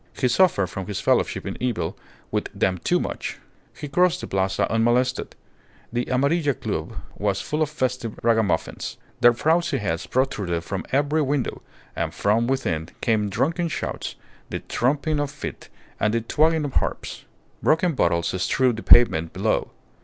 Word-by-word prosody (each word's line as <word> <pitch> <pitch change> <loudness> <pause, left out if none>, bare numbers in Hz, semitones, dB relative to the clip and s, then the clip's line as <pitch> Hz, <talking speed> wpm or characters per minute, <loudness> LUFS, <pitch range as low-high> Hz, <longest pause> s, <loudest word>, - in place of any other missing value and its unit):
He 130 - +2
suffered 130 - +4
from 95 0 -6
his 105 - -3
fellowship - - +1
in - - -5
evil 105 -10 -1 0.4
with - - -1
them 90 -1 +1
too - - +1
much. - - -4 0.4
He 150 - -5
crossed 180 +3 +2
the - - -4
Plaza 95 0 0
unmolested. 120 +3 +1 0.6
The 120 0 0
Amarilla 140 +2 +1
Club 110 -12 -4 0.3
was 100 -1 0
full 150 +1 -2
of 155 - +2
festive 130 -6 -2
ragamuffins. 110 -7 0 0.2
Their 120 -1 +7
frowsy 165 +4 +1
heads 85 -8 -2
protruded 100 -11 0
from 95 +2 -4
every 145 +3 +2
window, 140 -2 -1 0.3
and - - -2
from 110 +3 +2
within 85 -12 -1
came 105 -3 +1
drunken 165 - 0
shouts, 160 - -4 0.3
the - - -4
thumping 145 +4 +1
of 145 -1 -1
feet, 145 0 -7 0.3
and 110 +1 +1
the 115 - +1
twanging 155 +6 +2
of 140 - -4
harps. - - -2 0.4
Broken 165 +2 +3
bottles 85 -8 +1
strewed 125 +3 +2
the - - -5
pavement 85 -11 +5
below. - - 0
125 Hz, 155 wpm, -24 LUFS, 100-145 Hz, 0.6 s, Their